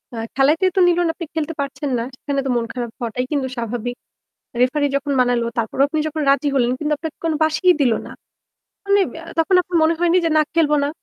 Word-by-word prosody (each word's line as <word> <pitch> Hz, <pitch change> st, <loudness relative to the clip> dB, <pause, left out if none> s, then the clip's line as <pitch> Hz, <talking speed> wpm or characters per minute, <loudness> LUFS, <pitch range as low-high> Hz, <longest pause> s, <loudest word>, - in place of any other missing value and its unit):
আ -, -, -6 dB, 0.2 s
খেলাতেই 305 Hz, +7 st, +3 dB
তো -, -, +3 dB
নিল 350 Hz, -1 st, +3 dB
না, -, -, +1 dB
আপনি 335 Hz, -, -6 dB
খেলতে 320 Hz, +1 st, -2 dB
পারছেন 280 Hz, 0 st, -3 dB
না। 230 Hz, -, -1 dB
সেখানে 280 Hz, +1 st, -2 dB
তো -, -, -1 dB
মন 235 Hz, -1 st, 0 dB
খারাপ 240 Hz, -3 st, -4 dB
হওয়াটাই 245 Hz, +1 st, -3 dB
কিন্তু 280 Hz, -3 st, 0 dB
স্বাভাবিক। 240 Hz, +1 st, -3 dB, 0.7 s
রেফারি 285 Hz, +4 st, +2 dB
যখন 280 Hz, +1 st, -2 dB
বানালো, 245 Hz, -1 st, +2 dB
তারপরেও 230 Hz, +4 st, +1 dB
আপনি 310 Hz, -, -2 dB
যখন 310 Hz, 0 st, -3 dB
রাজি 280 Hz, +1 st, +2 dB
হলেন 245 Hz, -3 st, +2 dB
কিন্তু 300 Hz, 0 st, -1 dB
আপনাকে 320 Hz, -1 st, -6 dB
কোন 325 Hz, -, +1 dB
বাশিই 315 Hz, +4 st, +3 dB
দিল 255 Hz, -4 st, +4 dB
না। -, -, -9 dB, 0.7 s
মানে 400 Hz, 0 st, +4 dB
আব -, -, -9 dB, 0.3 s
তখন 325 Hz, +3 st, +2 dB
আপনার 355 Hz, 0 st, -3 dB
মনে 320 Hz, +1 st, +3 dB
হয়নি 345 Hz, 0 st, +3 dB
যে, 330 Hz, -, +1 dB
"না -, -, +5 dB
খেলব 320 Hz, -3 st, +3 dB
না?" -, -, 0 dB
290 Hz, 220 wpm, -20 LUFS, 250-325 Hz, 0.7 s, না